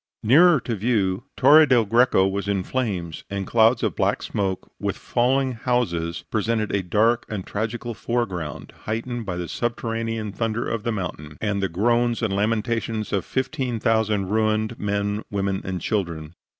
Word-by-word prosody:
Nearer 155 +7 +6
to 120 - -3
view, 105 -1 0
Torre 150 +4 +7
del 120 -4 +4
Greco 115 -3 +4
in 100 -1 -1
flames, 95 -10 -3
and 100 -1 -3
clouds 115 +2 +3
of - - 0
black - - 0
smoke, 95 -2 -3
with - - -2
falling 130 +2 +1
houses, 110 -9 -1
presented 110 0 0
a 100 - +2
dark 110 +6 +2
and 100 -4 -4
tragical 115 +3 -3
foreground, 100 -9 -3
heightened 115 +1 -3
by 90 -2 -3
the 90 -1 -4
subterranean 115 -1 -2
thunder 115 +2 -2
of 115 - -2
the 115 - -1
mountain, 80 -7 -5
and 105 -2 -1
the 95 - 0
groans 120 +6 +1
and 105 -3 0
lamentations 110 +1 -1
of 95 -4 0
fifteen 130 -2 -2
thousand 110 -3 +1
ruined 110 +1 0
men, 100 0 -1
women 100 -1 -1
and 95 -1 -4
children. 85 -6 -2
110 Hz, 155 wpm, -23 LUFS, 100-120 Hz, -, Torre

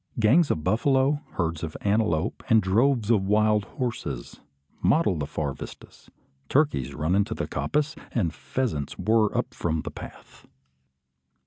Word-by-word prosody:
Gangs 140 +9 +4
of 75 - -1
buffalo, 135 - +2
herds 85 -3 -2
of 80 -2 -5
antelope, 100 -6 0
and 110 - +6
droves 115 +4 +2
of 110 -4 +4
wild 105 0 +3
horses, 120 - -5 0.4
mottle 150 - +3
the 75 -3 -3
far 75 -2 -3
vistas. - - -11 0.4
Turkeys 70 - +1
run 80 +3 0
into 100 +3 +1
the - - -2
coppice, 150 0 -1 0.2
and 85 -10 0
pheasants 75 - -3
whirr 110 +2 +2
up - - -1
from 80 -2 -1
the - - -6
path. - - -12
105 Hz, 140 wpm, -26 LUFS, 80-125 Hz, 0.4 s, and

